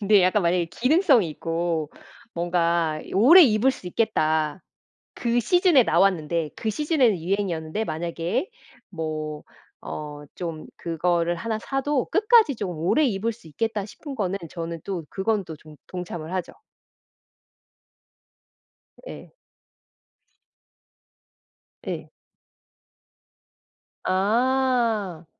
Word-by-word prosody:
근데 205 -2 +5
약간 185 +2 +3
만약에 170 0 +1
기능성이 255 - +3
있고 165 -1 -2 0.4
뭔가 170 -2 0
이 - - -12
'오래 285 - +8
입을 240 0 +4
수 185 - -9
있겠다.' 160 -6 0 0.5
그 240 0 0
시즌에 350 - +4
나왔는데, 170 -4 +1
그 220 - -3
시즌에는 265 - +2
유행이었는데 180 0 -2
만약에 170 - -3 0.4
뭐 155 -3 -5 0.4
어 150 -1 -7
좀 165 -3 -6
그거를 170 +1 0
1 220 +5 -3
사도 270 +1 -1
'끝까지 425 - +4
좀 200 -4 -4
오래 185 - +2
입을 225 0 -1
수 215 -8 -17
있겠다.' 210 +6 -2
싶은 275 +6 -9
거는 195 -3 -1
저는 165 -1 -5
또 185 -5 -4
그건 200 +1 -1
또 160 -2 -8
좀 155 0 -15
동참을 175 -2 -6
하죠. 185 -2 -3 2.6
예. - - -11 2.5
네. - - -5 1.9
아. 225 -2 +1
185 Hz, 200 characters per minute, -24 LUFS, 165-230 Hz, 2.6 s, 오래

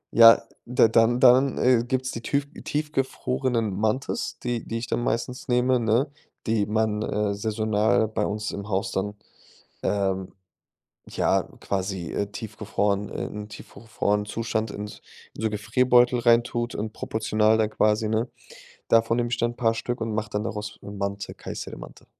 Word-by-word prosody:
Ja, 115 0 +9 0.2
da 120 -1 +4
dann 115 +2 +4
dann, 130 +2 +5
äh, 125 -2 +4
gibt's 130 +1 -1
die 115 - -6
tüf 140 +4 0 0.2
tiefgefrorenen 130 -6 -1
Mantis, 110 +6 -1
die 120 -1 -2
die 115 - -4
ich 115 - -4
dann 120 - -1
meistens 125 +2 -2
nehme, 125 0 +3
ne? 115 +5 +1 0.3
Die 110 -2 +1
man, 110 0 0
äh, 105 -1 0
saisonal 110 +1 +1
bei - - -1
uns 105 +1 -3
im 100 +1 -6
Haus 95 0 -1
dann, 105 +2 -2 0.7
ähm, 95 -2 -1 0.8
ja, - - +1 0.2
quasi, 95 -3 -3
äh, 100 - -1
tiefgefrorenen 105 -1 -2
in 105 0 -5
tiefgefrorenen 105 -1 -3
Zustand 110 0 -2
in 105 - -5
s 105 - -10 0.3
in - - -9
so 110 - +2
Gefrierbeutel 120 +4 +3
reintut 120 0 +2
und 110 +1 -4
proportional 110 0 +1
dann 110 -1 +1
quasi 110 +1 +2
ne? 110 +2 0 0.6
Davon 115 0 +4
nehm 120 0 +1
ich 120 - -2
dann 120 0 +1
'n - - -18
paar 115 -2 +2
Stück 120 +2 -3
und 115 -1 -2
mache 105 0 -2
dann 105 0 -2
daraus, 105 -2 -5
äh, 100 - -7
Mantı, 100 0 -4
Kayseri - - -7
Mantı. - - -12
110 Hz, 160 wpm, -25 LUFS, 105-120 Hz, 0.8 s, Ja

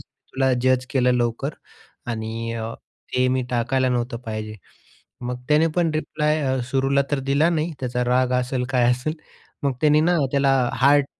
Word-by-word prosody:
तुला 130 0 -2
जज 130 0 +2
केलं 125 -2 +3
लवकर 120 +4 -1 0.6
आणि 115 +1 -4
अ, 115 0 -4 0.4
ते 125 0 +3
मी 130 0 +1
टाकायला 125 +2 +1
नव्हतं 120 -1 -1
पाहिजे. 110 -1 -5 0.7
मग 125 0 -4
त्याने 150 +2 +4
पण 175 -2 +2
रिप्लाय 155 0 0
अ, 130 0 0
सुरूला 135 +1 +2
तर 145 - +1
दिला 145 +4 +3
नाही 165 0 -1
त्याचा 125 -1 -1
राग 125 +1 +2
असेल 125 0 -2
काय 125 -2 +3
असेल. 125 +5 -2 0.5
मग 140 -1 +1
त्याने 150 0 +5
ना, 175 +2 +3
त्याला 135 -3 +2
हार्ट 140 +4 +4
130 Hz, 160 wpm, -23 LUFS, 125-145 Hz, 0.7 s, त्याने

